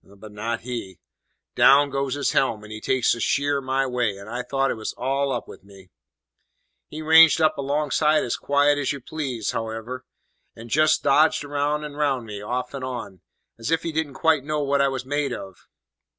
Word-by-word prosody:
But 100 Hz, +2 st, -14 dB
not 115 Hz, +2 st, -4 dB
he. 115 Hz, -7 st, -6 dB, 0.6 s
Down 140 Hz, +1 st, +5 dB
goes 135 Hz, -1 st, -1 dB
his 145 Hz, -, 0 dB
helm, 110 Hz, -5 st, +1 dB
and 105 Hz, -, -11 dB
he 110 Hz, 0 st, -7 dB
takes 130 Hz, +1 st, +2 dB
a 120 Hz, -, -5 dB
sheer 140 Hz, +3 st, +1 dB
my 135 Hz, +1 st, 0 dB
way, 125 Hz, -6 st, -1 dB
and 100 Hz, +1 st, -11 dB
I 120 Hz, +3 st, -4 dB
thought 135 Hz, +1 st, 0 dB
it -, -, -2 dB
was 110 Hz, -1 st, -5 dB
all 135 Hz, +2 st, -1 dB
up 120 Hz, -, -3 dB
with -, -, -13 dB
me. 95 Hz, -2 st, -17 dB, 1.0 s
"He 155 Hz, +1 st, -7 dB
ranged 160 Hz, +1 st, +7 dB
up 155 Hz, -1 st, +3 dB
alongside 150 Hz, +2 st, +1 dB
as 120 Hz, -, -2 dB
quiet 145 Hz, +1 st, +2 dB
as 140 Hz, -, 0 dB
you 140 Hz, -, -5 dB
please, 130 Hz, -6 st, -4 dB
hows'ever, 115 Hz, +3 st, -5 dB, 0.5 s
and 115 Hz, 0 st, -11 dB
just 155 Hz, +1 st, +3 dB
dodged 155 Hz, +2 st, +3 dB
round 145 Hz, +1 st, -1 dB
and 145 Hz, -1 st, -8 dB
round 140 Hz, -5 st, 0 dB
me, 105 Hz, -2 st, -7 dB
off 125 Hz, +5 st, -4 dB
and 135 Hz, -2 st, -6 dB
on, 115 Hz, -8 st, -6 dB, 0.4 s
as 115 Hz, -, -4 dB
if 165 Hz, 0 st, +1 dB
he 165 Hz, -, -3 dB
didn't 155 Hz, -3 st, -3 dB
quite 160 Hz, -3 st, +2 dB
know 150 Hz, 0 st, -2 dB
what 140 Hz, 0 st, +1 dB
I 140 Hz, -, +4 dB
was 135 Hz, -1 st, -4 dB
made 145 Hz, -1 st, -1 dB
of. 95 Hz, -4 st, -10 dB
135 Hz, 200 wpm, -23 LUFS, 115-145 Hz, 1.0 s, ranged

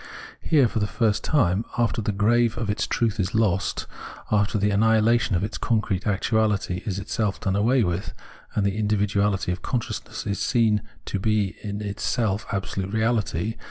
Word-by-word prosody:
Here, 145 Hz, -6 st, +4 dB
for 110 Hz, -, -2 dB
the 105 Hz, -, 0 dB
first 110 Hz, -1 st, 0 dB
time, 110 Hz, -, +2 dB
after 115 Hz, -1 st, +1 dB
the 105 Hz, -, -1 dB
grave 115 Hz, +3 st, +2 dB
of 110 Hz, -3 st, -1 dB
its 105 Hz, +2 st, -1 dB
truth 115 Hz, -2 st, 0 dB
is 95 Hz, +3 st, -1 dB
lost, 100 Hz, -4 st, +1 dB, 0.5 s
after 105 Hz, +1 st, +2 dB
the 105 Hz, +1 st, +1 dB
annihilation 110 Hz, +1 st, +3 dB
of 85 Hz, -, 0 dB
its 105 Hz, -, -4 dB
concrete 105 Hz, -4 st, 0 dB
actuahty 105 Hz, -3 st, +1 dB
is 95 Hz, -3 st, -1 dB
itself 100 Hz, 0 st, -2 dB
done 95 Hz, 0 st, -1 dB
away 115 Hz, +5 st, +3 dB
with, 90 Hz, +3 st, -2 dB, 0.4 s
and 105 Hz, -, +1 dB
the 100 Hz, +2 st, 0 dB
individuahty 100 Hz, -2 st, +1 dB
3f -, -, -16 dB
consciousness 120 Hz, -3 st, -4 dB
is 100 Hz, -, -2 dB
seen 110 Hz, -3 st, +2 dB, 0.2 s
to 100 Hz, -, -3 dB
be 105 Hz, -1 st, 0 dB
in 105 Hz, 0 st, -5 dB
itself 105 Hz, +1 st, -1 dB
absolute 95 Hz, 0 st, -3 dB
reahty 110 Hz, -2 st, 0 dB
105 Hz, 165 wpm, -24 LUFS, 100-110 Hz, 0.5 s, Here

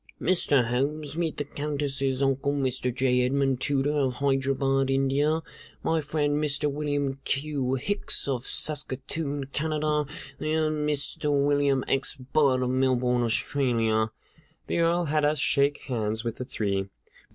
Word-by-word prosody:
Mr. 140 Hz, -9 st, +2 dB
Holmes, 145 Hz, +4 st, -1 dB
meet 165 Hz, -2 st, -1 dB
the -, -, -1 dB
Countess's 140 Hz, -2 st, -2 dB
uncle, 135 Hz, +1 st, +1 dB
Mr. 130 Hz, -2 st, -1 dB
J. 125 Hz, 0 st, +2 dB
Edmund 135 Hz, 0 st, +1 dB
Tooter, 140 Hz, +1 st, +1 dB
of 130 Hz, -2 st, +1 dB
Hyderabad, 135 Hz, 0 st, +1 dB
India; 140 Hz, +4 st, +2 dB, 0.4 s
my 160 Hz, -1 st, +1 dB
friend, 150 Hz, 0 st, 0 dB
Mr. 145 Hz, 0 st, 0 dB
William 145 Hz, -2 st, -1 dB
Q. 135 Hz, -2 st, -1 dB
Hicks, 200 Hz, +8 st, -2 dB
of 130 Hz, -2 st, -2 dB
Saskatoon, 145 Hz, 0 st, -1 dB
Canada; 150 Hz, -1 st, 0 dB, 0.3 s
and 155 Hz, -1 st, 0 dB
Mr. 145 Hz, +1 st, -3 dB
William 140 Hz, -2 st, +2 dB
X. 135 Hz, 0 st, -1 dB
Budd, 130 Hz, 0 st, +2 dB
of 125 Hz, -, 0 dB
Melbourne, 125 Hz, -1 st, +2 dB
Australia." 115 Hz, -2 st, +1 dB, 0.6 s
The -, -, -1 dB
Earl 170 Hz, +1 st, +2 dB
had 150 Hz, 0 st, +1 dB
us 150 Hz, +1 st, +2 dB
shake 140 Hz, +1 st, +2 dB
hands 110 Hz, -3 st, -2 dB
with 115 Hz, -1 st, -3 dB
the 125 Hz, -, -4 dB
three. 100 Hz, -5 st, -2 dB
140 Hz, 135 wpm, -27 LUFS, 130-150 Hz, 0.6 s, Mr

